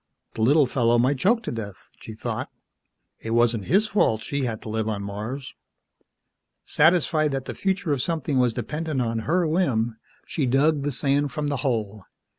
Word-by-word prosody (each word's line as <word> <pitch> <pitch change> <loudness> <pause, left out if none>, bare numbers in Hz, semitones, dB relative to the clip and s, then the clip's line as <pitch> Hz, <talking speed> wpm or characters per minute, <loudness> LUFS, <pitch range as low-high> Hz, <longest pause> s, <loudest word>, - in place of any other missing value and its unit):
The 115 - -5
little 145 +6 +5
fellow 120 -2 +2
might 130 +3 +2
choke 230 - +2
to - - -4
death, 105 -5 -8
she 110 - -9
thought, - - -4 0.7
it 115 0 -3
wasn't 115 -4 +2
his 200 +4 +3
fault 155 - +1
she 140 +2 -2
had 115 -3 -3
to - - -7
live 110 0 -1
on 100 -2 -3
Mars. 110 +7 -6 1.1
Satisfied 155 -2 +3
that 135 -1 -3
the - - -5
future 190 -5 -1
of 135 - -1
something 155 -3 -1
was 125 -1 +3
dependent 150 +5 -3
on 115 -2 -1
her 175 +1 +3
whim, 125 -10 0 0.3
she 140 -5 -1
dug 145 +4 +3
the 145 +1 -1
sand 140 +2 0
from 150 +2 -2
the 140 - -1
hole. 110 -6 -2
130 Hz, 180 wpm, -24 LUFS, 115-155 Hz, 1.1 s, little